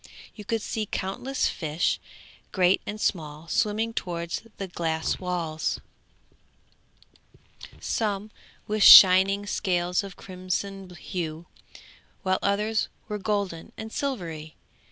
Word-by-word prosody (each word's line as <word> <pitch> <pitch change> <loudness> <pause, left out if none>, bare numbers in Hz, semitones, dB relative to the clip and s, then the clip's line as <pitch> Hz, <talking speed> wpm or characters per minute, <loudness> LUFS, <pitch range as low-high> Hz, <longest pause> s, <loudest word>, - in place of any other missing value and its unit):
You 210 - -10
could 225 0 -1
see 215 -2 -3
countless 220 +10 -2
fish, 160 0 -1 0.5
great 185 0 +3
and 210 +1 -5
small, 155 -4 -2
swimming 220 +4 0
towards 170 -4 -3 0.2
the 195 - -4
glass 160 -2 -2
walls, 170 -4 -2 2.0
some 210 -2 -2 0.3
with 215 0 -2
shining 195 +1 +9
scales 180 -3 0
of 195 -2 -9
crimson 185 +1 -5
hue, 170 -2 -5 0.8
while 185 -1 +1
others 210 +2 0 0.2
were 210 0 -4
golden 200 -5 -3
and 220 0 -7
silvery. 170 - -4
190 Hz, 105 wpm, -26 LUFS, 170-210 Hz, 2.0 s, shining